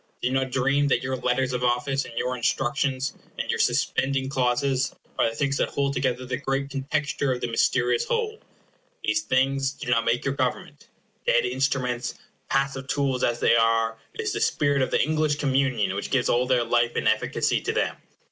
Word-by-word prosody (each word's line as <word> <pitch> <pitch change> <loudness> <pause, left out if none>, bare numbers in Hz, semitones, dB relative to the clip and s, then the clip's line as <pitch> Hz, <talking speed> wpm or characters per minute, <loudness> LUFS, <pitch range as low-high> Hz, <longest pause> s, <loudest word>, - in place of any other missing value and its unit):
Do 125 - -1
not 130 0 0
dream 135 +3 +2
that 140 - +1
your 130 0 -1
letters 125 +1 0
of 125 0 -2
office, 125 +3 +1
and 115 - -11
your 125 +1 -1
instructions, 130 +2 0 0.2
and - - -3
your - - -2
suspending 135 -1 +1
clauses, 130 +1 0 0.2
are - - +4
the 115 - -8
things 140 0 0
that - - 0
hold 140 0 -1
together 130 -1 -1
the 125 0 -2
great 135 +1 -2
contexture 140 0 -1
of 125 - -1
the 120 - -3
mysterious 120 +1 +2
whole. 450 -1 -1 0.6
These 320 - +1
things 135 - +1
do 125 - -5
not 115 -2 +3
make 115 +1 +1
your 135 - +1
government. 130 -2 -3 0.4
Dead - - +4
instruments, 125 -1 -1 0.3
passive 135 -1 0
tools 135 -3 0
as 120 0 0
they - - +5
are, 115 0 +2 0.2
it - - -3
is - - -2
the - - -3
spirit 145 -1 +2
of 130 - +1
the - - +1
English 155 -1 +1
communion 130 -9 +1
that 100 - -4
gives 130 -3 +1
all 125 +1 +2
their 125 -2 +3
life 120 0 +1
and - - 0
efficacy - - +1
to - - -1
them. - - 0
130 Hz, 195 wpm, -25 LUFS, 125-140 Hz, 0.6 s, they